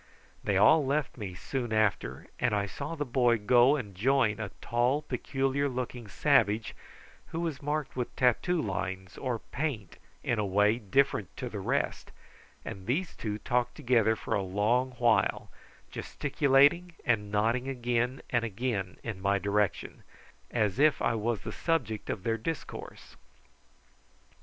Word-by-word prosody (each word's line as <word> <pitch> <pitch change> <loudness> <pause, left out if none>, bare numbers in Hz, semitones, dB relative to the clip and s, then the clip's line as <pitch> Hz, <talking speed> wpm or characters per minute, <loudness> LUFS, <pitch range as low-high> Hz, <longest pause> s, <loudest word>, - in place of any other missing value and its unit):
They 100 -2 +1
all 150 +10 +6
left 140 +2 -1
me 100 -6 -6
soon 120 +4 -4
after, 105 - 0
and 125 -4 +2
I 100 -1 +1
saw 100 - -5
the 145 -2 -2
boy 120 -2 +3
go 120 +6 +5
and 110 -9 -5
join 115 +1 +2
a 110 -2 -3
tall, 125 +5 +1
peculiar 135 +2 -1
looking 125 -2 -5
savage, 110 0 +2 0.5
who 165 - -5
was 160 -5 -3
marked 150 -1 -2
with 125 -2 -3
tattoo 125 - +2
lines 95 - -3
or 125 -3 -1
paint 120 - -4 0.3
in 120 - 0
a - - +1
way 105 +3 +3
different 110 - 0
to - - -4
the - - -5
rest, - - -1 0.6
and 95 -1 -7
these 170 +9 -1
two 105 -2 -3
talked 120 +2 -1
together 115 -3 +3
for - - -4
a 100 - +2
long 110 +7 +1
while, 120 -4 +2 0.4
gesticulating 145 +4 +2
and 105 -4 +1
nodding 115 +5 +1
again 125 0 -1
and 120 -2 +2
again 105 -4 -2
in 110 -5 -5
my 100 +1 +2
direction, 100 +1 -1 0.5
as 110 0 0
if 150 0 +4
I 120 - +1
was 115 0 -1
the - - -6
subject 120 -11 -1
of 95 - -3
their 115 -1 0
discourse. 160 +7 -6
120 Hz, 150 wpm, -29 LUFS, 105-135 Hz, 0.6 s, all